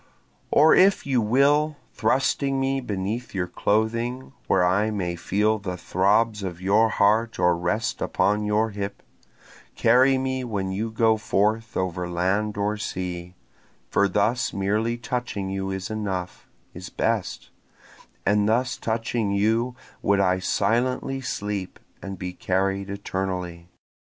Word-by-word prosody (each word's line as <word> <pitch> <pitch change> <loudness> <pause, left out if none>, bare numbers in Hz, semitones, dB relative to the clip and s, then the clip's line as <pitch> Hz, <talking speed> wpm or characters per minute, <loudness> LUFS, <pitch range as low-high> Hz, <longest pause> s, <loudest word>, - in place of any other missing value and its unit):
Or 155 +2 +6
if 195 +1 +4
you 130 -4 +2
will, 145 +7 +3 0.2
thrusting 135 +4 +1
me 135 0 0
beneath 105 +1 -4
your 90 -2 0
clothing, 115 +8 -1
Where 90 -2 +3
I 100 +5 +2
may 90 -5 -2
feel 105 +5 +1
the 90 -3 -5
throbs 105 +5 +1
of 90 -3 -5
your 100 +4 +3
heart 110 +3 +2
or 90 -1 +3
rest 90 +6 -2
upon 105 +1 +1
your 105 +1 +1
hip, 100 0 -5 0.7
Carry 130 +3 +4
me 130 0 -2
when 100 -5 -3
you 105 +4 -2
go 110 0 +2
forth 110 +1 0
over 90 -1 -2
land 100 +5 0
or 105 +1 0
sea; 90 -4 -5 0.6
For 100 - +3
thus 105 +6 0
merely 105 +4 0
touching 120 -6 -3
you 95 0 -3
is 95 +1 -4
enough, 95 -4 -4 0.2
is 90 +1 -8
best, 110 -4 -2 0.7
And 105 +1 +3
thus 125 +3 +1
touching 115 -1 -1
you 110 +5 +1 0.3
would 100 0 +2
I 95 -1 +2
silently 125 +7 0
sleep 105 -6 -4 0.2
and 95 -1 -6
be 90 0 -5
carried 95 +2 -1
eternally. 95 -3 -4
105 Hz, 135 wpm, -24 LUFS, 95-115 Hz, 0.7 s, Or